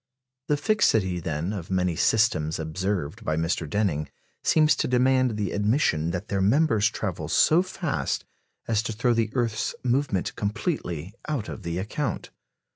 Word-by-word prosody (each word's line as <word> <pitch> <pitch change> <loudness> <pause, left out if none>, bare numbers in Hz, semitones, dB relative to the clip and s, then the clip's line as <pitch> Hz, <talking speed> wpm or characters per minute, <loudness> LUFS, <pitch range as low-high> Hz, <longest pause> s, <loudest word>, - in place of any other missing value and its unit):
The 150 - +2
fixity, 110 - +2
then, 80 +3 -3
of 90 -5 -6
many 90 -2 +1
systems 90 -7 +2
observed 95 +4 -3
by 80 -7 0
Mr. 80 -1 -1
Denning 80 -6 0 0.3
seems 155 -1 +4
to - - 0
demand 130 -2 +2
the 100 -4 -1
admission 105 - +1
that 90 +4 -4
their 100 -1 -1
members 110 0 +3
travel - - -4
so 160 +3 +4
fast 185 -4 -2 0.4
as 110 -2 +2
to 115 - -4
throw 120 +3 +2
the 115 -2 +1
earth's 115 -3 -1
movement 125 -6 0
completely 100 - -3
out 140 -8 -2
of - - -7
the 85 -2 -3
account. 110 +6 -3
105 Hz, 150 wpm, -26 LUFS, 90-125 Hz, 0.4 s, seems